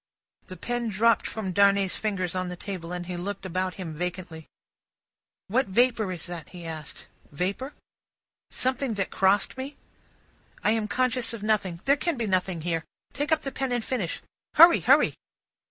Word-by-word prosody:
The 185 - -8
pen 240 +5 -2
dropped 225 +3 +3
from 210 -4 -4
Darnay's 200 0 +4
fingers 190 -5 -2
on 185 -1 -2
the 180 - -5
table, 180 -2 -6
and 180 0 -4
he 180 0 -5
looked 195 +3 -4
about 185 0 -2
him 175 -5 -6
vacantly. 175 -1 -5 1.0
"What 255 +7 +1
vapour 225 -1 +2
is 175 -3 -5
that?" 175 -4 -7
he 175 -2 -10
asked. 155 -2 -7 0.3
"Vapour?" 200 - -3 0.7
"Something 260 -2 0
that 195 -2 -2
crossed 195 +6 +2
me?" 275 +3 -6 0.9
"I 210 - +4
am 220 -1 0
conscious 250 -1 +1
of 220 -3 -7
nothing; 195 -5 0
there 280 +1 +4
can 335 -1 -1
be 235 - -1
nothing 185 -3 0
here. 165 -1 -1 0.3
Take 290 +2 -2
up 315 -1 +2
the 275 - -3
pen 265 -1 -2
and 240 -2 -1
finish. 210 -10 -2 0.3
Hurry, 335 +2 +9
hurry!" - - +4
200 Hz, 170 wpm, -27 LUFS, 180-240 Hz, 1.0 s, Hurry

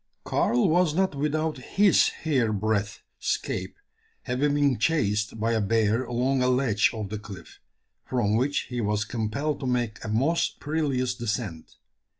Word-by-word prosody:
Karl 120 +1 +2
was 170 -1 +2
not 190 -1 +1
without 150 +1 -1
his 195 +8 +3 0.2
hair 130 -8 +2
breadth 105 0 -1 0.2
"'scape" - - -3 0.5
having 140 +3 0
been 140 -5 +2
chased 110 -7 0
by 115 +2 +1
a 110 -1 +1
bear 110 +3 +1
along 125 +2 0
a 125 - +2
ledge 125 -5 +3
of 110 -3 -5
the 105 0 -4
cliff, 95 -5 -11 0.4
from 115 -5 0
which 135 +5 +1
he 125 -1 -2
was 105 0 0
compelled 125 +7 -2
to 135 - -4
make 120 -4 -1
a - - -5
most 135 +10 +1
perilous 140 -5 -1
descent. 110 -8 -4
125 Hz, 150 wpm, -26 LUFS, 110-145 Hz, 0.5 s, his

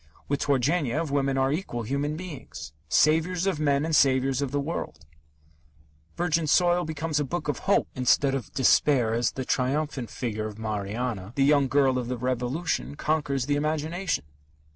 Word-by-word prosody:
With 140 0 -1
Turgenev, 145 +2 0
women 135 -1 +1
are 135 0 +2
equal 145 -7 -3
human 140 +6 -2
beings 140 - -8 0.2
saviours 165 +4 +3
of 190 -6 0
men 145 -1 +2
and 160 -1 0
saviours 135 -1 +3
of 140 - -1
the 145 +2 -1
world. 80 - -5 1.1
Virgin 165 -2 +1
Soil 175 +2 +3
becomes 155 0 -2
a - - +1
book 170 +4 -4
of 145 - -1
hope 200 - +3
instead 135 +2 +2
of 135 -6 -4
despair 130 -3 +3
as 120 +1 0
the 130 - -4
triumphant 135 -1 -1
figure 110 -3 -3
of 105 -1 -9
Marianna, 110 0 -3
the 135 - +2
young 140 -1 +4
girl 135 -1 +2
of 120 - -4
the 125 0 -3
Revolution, 130 +6 -2
conquers 145 -4 -1
the 145 +1 +1
imagination. 155 - -1
140 Hz, 165 wpm, -26 LUFS, 125-155 Hz, 1.1 s, young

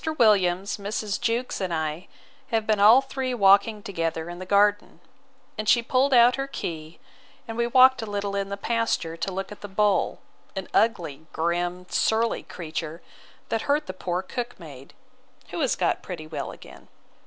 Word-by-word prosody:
Williams, 195 -4 +3
Mrs. 205 0 -3
Jewkes, 240 -1 -1
and 185 -2 -2
I, 160 +2 -3 0.4
have 225 -1 0
been 215 -2 +1
all 220 +6 +8
three 265 -2 -3
walking 200 0 +4
together 165 -3 -3
in 175 - -8
the 185 - -8
garden; 205 +1 +2 0.6
and 215 0 -1
she 235 0 +5
pulled 260 +3 +2
out 245 0 +6
her 270 0 -2
key, 160 - -6 0.5
and 225 - -5
we 235 0 0
walked 260 +1 +6
a 225 - -5
little 200 -1 -3
in 195 0 -2
the 200 - -4
pasture 225 -7 -1
to 170 +3 -3
look 195 +2 -5
at 210 - -10
the 205 - -6
bull, 205 0 +1 0.4
an 190 -1 -4
ugly, 165 -9 0
grim, 175 +2 -1
surly 225 +4 +1
creature, 160 0 -6 0.5
that 225 - 0
hurt 295 +2 +2
the 185 - -6
poor 180 0 -3
cook 240 +4 -5
maid; 140 -6 -12 0.5
who - - -4
is - - +1
got - - 0
pretty 170 -4 -7
well 150 -3 -5
again. - - -14
200 Hz, 175 wpm, -25 LUFS, 175-230 Hz, 0.6 s, all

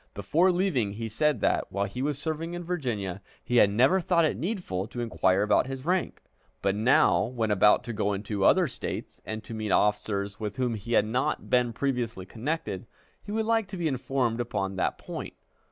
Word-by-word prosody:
Before 160 - +3
leaving, 170 - 0
he 115 +2 -4
said 150 +7 +1
that, - - +1
while 100 +1 0
he 110 +6 -5
was 145 0 -1
serving 160 +3 -3
in 175 - -5
Virginia, 115 - -3 0.2
he 125 - 0
had 105 - +7
never 130 - +4
thought 170 -1 +3
it 155 - 0
needful 170 - -3
to 120 - -7
inquire 100 -4 +2
about 105 +4 +3
his 135 0 -6
rank; 180 +1 -1 0.4
but 100 -1 +2
now, 110 0 +4
when 115 -2 -2
about 105 +1 +5
to 120 - -5
go 105 -1 0
into 100 0 -3
other 180 - +5
States 130 - -6
and 110 0 -4
to - - -8
meet 110 -1 -3
officers 100 0 +1
with 105 -2 -4
whom 125 -2 0
he 115 +2 -5
had 105 - +4
not 125 +4 -1
been 125 -1 +3
previously 120 -6 -2
connected, 115 - -4 0.3
he 205 - -9
would 220 +1 0
like 225 -2 +1
to 190 0 -7
be 170 -2 0
informed 130 -3 -1
upon 100 -5 -2
that 95 - -1
point. - - -7
120 Hz, 200 wpm, -27 LUFS, 105-155 Hz, 0.4 s, had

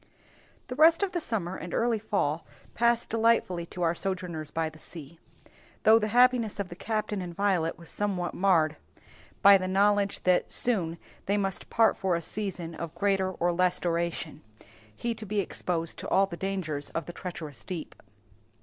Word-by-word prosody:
The 250 - -6
rest 325 +5 +6
of 390 - 0
the 345 - -2
summer 190 - -2
and 170 +2 -6
early 230 -1 +1
fall 170 -7 -1 0.3
passed 235 0 +2
delightfully 220 -7 +2
to 180 - -5
our 165 0 +3
sojourners 175 -4 -3
by 160 0 -1
the 155 0 -11
sea; 160 -1 -8 0.6
though 220 +1 +7
the 215 - -1
happiness 245 -2 +3
of 195 -2 -3
the 175 - -8
captain 215 0 -2
and 175 -2 -6
Violet 185 -5 +1
was 170 0 -10
somewhat 190 -4 -1
marred 165 -5 +2 0.7
by 200 -1 +9
the 185 - -3
knowledge 200 +1 +2
that 180 -1 +2
soon 175 -9 +1 0.3
they 200 +1 +2
must 195 -1 -2
part 225 -1 +4
for 190 -2 0
a 170 - -2
season 180 -4 -4
of 165 0 -6
greater 195 -2 +1
or 175 -1 0
less 180 +1 +2
duration, 170 -2 -2 0.5
he 235 - -2
to 220 -1 -8
be 210 +1 0
exposed 170 -3 -2
to - - -6
all 195 - +4
the 175 - -7
dangers 170 -6 -3
of 165 - -4
the 175 - -8
treacherous 170 -6 -7
deep. 175 -5 -6
185 Hz, 175 wpm, -28 LUFS, 170-210 Hz, 0.7 s, by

